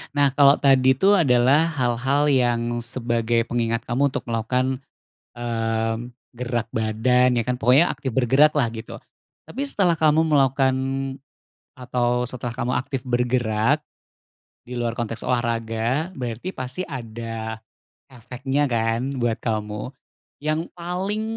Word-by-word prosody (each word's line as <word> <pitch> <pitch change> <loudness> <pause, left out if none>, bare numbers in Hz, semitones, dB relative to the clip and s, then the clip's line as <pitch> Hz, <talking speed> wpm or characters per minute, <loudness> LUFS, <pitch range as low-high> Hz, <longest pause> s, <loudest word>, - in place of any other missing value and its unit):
Nah, 140 -2 +3
kalo 140 0 +6
tadi 130 -1 +4
tuh 195 +7 +4
adalah 135 +2 +4
hal-hal 135 0 +1
yang 120 -2 +1
sebagai 115 -1 0
pengingat 115 -1 -1
kamu 135 +4 +1
untuk - - -4
melakukan, 125 +3 -1 0.6
mmm, 115 0 -2 0.3
gerak 120 -2 -2
badan, 125 +3 +2
ya 120 - +2
kan, 125 - +1
pokoknya 135 +6 +5
aktif 130 -4 -5
bergerak 135 +4 +4
lah, 125 -5 +2
gitu. 110 -1 -8 0.5
Tapi 270 - -5
setelah 195 -11 +2
kamu 155 0 +3
melakukan 135 -3 +3 1.0
atau 125 -1 0
setelah 120 -1 -5
kamu 125 0 -2
aktif 130 +1 -2
bergerak, 120 +1 +1 0.9
di 125 - -6
luar 120 -1 -1
konteks 115 -1 -4
olahraga, 120 +5 -1
berarti 125 - -4
pasti 130 +7 -5
ada 115 -4 -6 0.5
efeknya 135 +4 -2
kan 115 +4 0
buat 120 -2 0
kamu. 105 0 -3 0.5
Yang 155 +2 -2
paling 185 +5 -3
125 Hz, 125 wpm, -23 LUFS, 115-140 Hz, 1.0 s, kalo